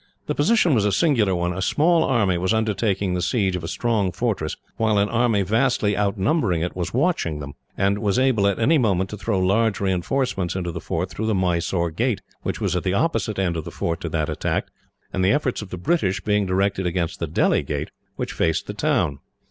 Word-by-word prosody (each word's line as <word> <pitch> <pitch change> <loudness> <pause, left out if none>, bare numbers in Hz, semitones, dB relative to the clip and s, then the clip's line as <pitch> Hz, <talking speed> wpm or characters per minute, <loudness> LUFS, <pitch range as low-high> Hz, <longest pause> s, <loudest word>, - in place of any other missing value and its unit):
The - - -1
position 180 0 +3
was 110 -5 +3
a 105 - +2
singular 110 - +2
one. 85 0 -1
A 95 - -4
small 165 - +3
army 105 -9 +2
was 95 +5 +1
undertaking 105 -3 0
the 90 - -1
siege 95 0 +1
of 90 - -4
a - - -4
strong 110 -2 0
fortress, 95 -5 -2 0.2
while 110 -2 +2
an 100 +1 +2
army 115 -4 +2
vastly 110 0 +1
outnumbering 100 - +1
it 85 - -3
was 90 -2 -3
watching 130 - 0
them; 70 -1 -7 0.2
and 100 +1 +1
was 100 0 0
able, 130 -6 +3
at 100 -2 +1
any 150 +7 +3
moment, 95 -5 +1
to 105 - -5
throw 105 0 -1
large 100 +3 +2
reinforcements 95 0 -1
into 90 -2 -2
the - - -6
fort 90 +3 -3
through 110 - -3
the 110 - +1
Mysore 85 -1 0
gate, 115 +6 -1 0.2
which - - -3
was - - -1
at 90 - 0
the 95 +1 -1
opposite 120 -7 0
end 90 -3 0
of 80 - -3
the - - -7
fort 85 -1 -3
to 85 - -3
that 80 -1 -1
attacked, - - -2 0.4
the 95 +1 +2
efforts 140 -5 0
of 105 - -8
the 90 - -6
British 95 - 0
being 105 -2 0
directed 95 0 0
against 85 0 -2
the 85 - -2
Delhi 75 - +2
gate, - - -4 0.2
which - - -4
faced 80 -1 0
the - - -5
town. 70 -1 0
100 Hz, 215 wpm, -23 LUFS, 90-115 Hz, 0.4 s, position